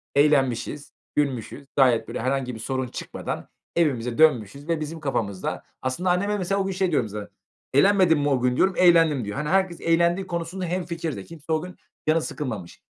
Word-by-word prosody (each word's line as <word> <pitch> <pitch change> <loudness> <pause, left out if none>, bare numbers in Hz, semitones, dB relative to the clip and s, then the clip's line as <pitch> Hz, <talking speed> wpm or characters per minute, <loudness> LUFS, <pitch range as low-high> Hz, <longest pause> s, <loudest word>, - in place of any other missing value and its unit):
eğlenmişiz, 140 -1 +2 0.2
gülmüşüz. 140 -1 -1
Gayet 125 -4 +4
böyle - - -4
herhangi 130 0 -1
bir - - -8
sorun 130 +2 -2
çıkmadan - - -6 0.3
evimize 125 -8 +1
dönmüşüz 140 -3 +3
ve 165 -2 0
bizim 155 +2 -5
kafamızda 110 -10 -2 0.2
Aslında 130 +8 -1
anneme, 200 +4 +1
mesela, 195 +1 0
o - - -1
gün 195 - -1
şey 185 -1 0
diyorum 140 -6 +2
mesela, 105 -1 -7 0.4
"Eğlenmedin 185 +1 +5
mi 145 0 +1
o 135 -3 +2
gün?" 125 0 +1
diyorum. 190 0 +3
"Eğlendim." 165 -8 +5
diyor. 105 +5 -5
Hani, 150 +1 -2
herkes 190 -2 +1
eğlendiği 170 +3 +2
konusunda 175 +2 -3
hemfikir 170 -3 -3
de. 100 - -7
Kimse 160 +2 -9
o 155 - +1
gün 180 +1 -8 0.3
canı 160 +1 +4
sıkılmamış. 110 - -5
150 Hz, 180 wpm, -25 LUFS, 130-175 Hz, 0.4 s, Eğlenmedin